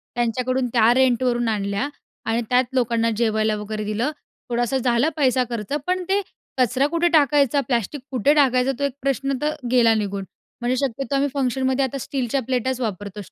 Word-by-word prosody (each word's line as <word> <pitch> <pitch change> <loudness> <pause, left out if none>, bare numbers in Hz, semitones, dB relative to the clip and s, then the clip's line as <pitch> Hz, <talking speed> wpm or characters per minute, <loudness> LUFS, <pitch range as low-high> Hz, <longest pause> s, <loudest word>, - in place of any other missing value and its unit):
त्यांच्याकडून 250 +2 0
त्या 230 0 +5
रेंटवरून 245 -2 +2
आणल्या 200 +3 -1 0.4
आणि 230 +1 0
त्यात 250 +1 +4
लोकांना 230 -2 +1
जेवायला 220 -2 +1
वगैरे 215 +1 -4
दिलं. 215 +7 -1 0.4
थोडासा 240 +2 0
झालं 245 +4 +2
पैसा 260 -3 +3
खर्च 230 +2 -4
पण 365 0 0
ते 400 +1 +2 0.4
कचरा 255 +3 +2
कुठे 335 +2 +1
टाकायचा? 285 -2 +4
प्लॅस्टिक 245 +2 -1
कुठे 265 +3 +3
टाकायचा? 265 -3 +3
तो - - -2
एक 280 -2 0
प्रश्न 275 0 0
तर 300 +1 0 0.2
गेला 235 -3 +5
निघून. 200 -2 -2 0.4
म्हणजे 245 +1 +1
शक्यतो 275 +3 -3
आम्ही 280 +1 +1
फंक्शनमध्ये 265 0 0
आता 270 +2 -4
स्टीलच्या 265 0 -2
प्लेटाच 260 0 -1
वापरतो. 205 -2 -4
स्टीलच्या 195 - -14
250 Hz, 165 wpm, -22 LUFS, 230-275 Hz, 0.4 s, त्या